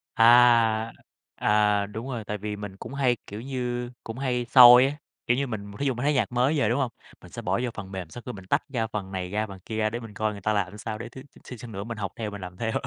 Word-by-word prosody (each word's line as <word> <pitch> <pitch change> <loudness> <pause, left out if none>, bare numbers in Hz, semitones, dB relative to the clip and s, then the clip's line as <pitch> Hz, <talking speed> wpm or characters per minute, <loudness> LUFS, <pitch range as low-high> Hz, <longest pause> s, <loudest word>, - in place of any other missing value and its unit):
À, 115 - +4 1.1
à, 105 -1 +2
đúng 110 +6 -7
rồi, 120 -5 -4
tại 105 0 -4
vì 105 +1 -4
mình 100 -2 -8
cũng 135 - -9
hay, 130 -3 +2
kiểu 105 +2 -7
như, 125 -2 -3
cũng 115 +2 -7
hay 125 -3 -1
soi 125 0 +9
á, 140 - -2 0.3
kiểu 120 - +3
như 140 0 0
mình, 100 -4 -6
thí 140 - -1
dụ 130 - +1
mà 120 - -5
thấy 145 +1 +2
nhạc 120 -3 0
mới 130 +5 +2
về, 110 - +2
đúng 120 +4 +1
hông, 130 -4 0 0.3
mình - - -14
sẽ - - -7
bỏ 95 +6 0
vô 120 - -1
phần 100 -2 -8
mềm, 90 -4 -6
sau 120 - -9
khi 125 - -4
mình 95 -2 -10
tách - - +1
ra 115 -4 -1
phần 100 -3 -6
này 90 -1 -4
ra, 105 +1 -1
phần 95 -2 -11
kia 110 - -5
ra 110 -1 +1
để 120 +2 -4
mình 110 -3 -10
coi 110 0 -1
người 100 - -9
ta 105 +3 0
làm 100 0 -2
sao, 110 +1 -5
để 115 +1 -7
thiếu 130 +3 -11 0.2
xíu 125 - -8
xíu 120 0 -9
nữa 100 -1 -5
mình 115 -1 -6
học 100 -2 -4
theo 110 -3 -4
mình 100 -1 -8
làm 90 -1 -8
theo. 115 +1 -2
110 Hz, 290 wpm, -26 LUFS, 105-125 Hz, 1.1 s, soi